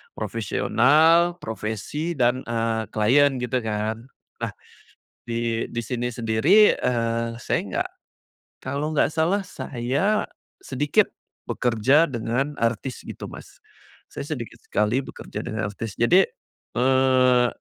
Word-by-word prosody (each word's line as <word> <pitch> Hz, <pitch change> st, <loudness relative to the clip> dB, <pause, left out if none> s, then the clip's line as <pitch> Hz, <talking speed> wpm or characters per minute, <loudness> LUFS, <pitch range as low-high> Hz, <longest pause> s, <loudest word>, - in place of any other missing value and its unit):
profesional, 150 Hz, -, +3 dB
profesi, 110 Hz, -, -4 dB
dan, 125 Hz, 0 st, +2 dB
eee, 115 Hz, -1 st, -1 dB
klien 135 Hz, +6 st, +3 dB
gitu 125 Hz, 0 st, -1 dB
kan. 110 Hz, +2 st, -3 dB, 0.3 s
Nah -, -, -3 dB, 0.7 s
di 115 Hz, -1 st, -1 dB
di 120 Hz, -, -3 dB
sini 120 Hz, +1 st, -3 dB
sendiri, 125 Hz, -, +4 dB
eee, 115 Hz, -1 st, 0 dB
saya -, -, 0 dB
nggak -, -, -1 dB, 0.8 s
kalau 140 Hz, +3 st, -2 dB
nggak 155 Hz, 0 st, +1 dB
salah, 185 Hz, +5 st, +1 dB
saya 140 Hz, -, -1 dB, 0.4 s
sedikit 145 Hz, +2 st, +1 dB, 0.3 s
bekerja 130 Hz, +7 st, +2 dB
dengan 130 Hz, +4 st, -2 dB
artis 115 Hz, +2 st, -2 dB
gitu, -, -, -7 dB
Mas. -, -, -13 dB, 0.5 s
Saya -, -, -6 dB
sedikit 120 Hz, -5 st, -7 dB
sekali 105 Hz, +6 st, +1 dB
bekerja -, -, -7 dB
dengan 110 Hz, -3 st, -3 dB
artis. 105 Hz, 0 st, -6 dB
Jadi, 180 Hz, +12 st, +5 dB, 0.5 s
eee, 130 Hz, -1 st, +4 dB
125 Hz, 110 wpm, -24 LUFS, 115-145 Hz, 0.8 s, Jadi